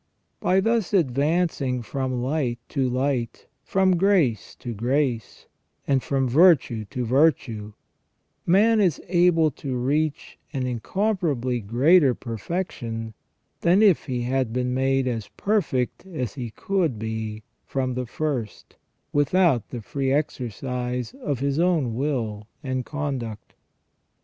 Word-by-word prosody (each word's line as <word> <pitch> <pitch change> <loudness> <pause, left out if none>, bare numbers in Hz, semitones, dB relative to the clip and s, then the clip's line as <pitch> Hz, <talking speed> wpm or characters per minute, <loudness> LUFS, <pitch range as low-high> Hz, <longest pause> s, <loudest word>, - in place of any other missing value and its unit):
By 190 +1 +3
thus 225 -1 +1
advancing 140 -3 +1
from 130 0 -2
light 130 -3 -1
to 135 -3 0
light, 130 -2 -1 0.2
from 190 -2 +2
grace 165 - +2
to 120 - -6
grace, 120 0 -1 0.4
and 135 -2 +2
from 135 -1 0
virtue 130 -6 +4
to 125 +4 -4
virtue, 120 -5 +1 0.7
man 215 +5 +4
is 180 -7 +2
able 175 -3 +4
to 130 0 -5
reach 150 +4 -1
an 130 -3 -1
incomparably 135 - -1
greater 130 - +4
per 115 -3 -6
fection 115 - -4 0.5
than 180 +5 +4
if 195 -6 +4
he 125 -3 -2
had 130 -1 0
been 125 +1 -1
made 135 0 +1
as 115 -4 -2
perfect 195 - 0
as 130 - -4
he 120 -4 -5
could 170 - -1
be 110 0 -4 0.2
from 130 -2 -2
the 125 0 -3
first, 130 -5 -4 0.4
without 145 - +2
the 120 - -6
free 135 +3 -2
exercise 125 - -2
of 140 - -2
his 140 +2 0
own 165 -9 +2
will 115 -6 -2 0.2
and 130 -2 -2
conduct. 135 -7 -4
130 Hz, 125 wpm, -24 LUFS, 120-160 Hz, 0.7 s, virtue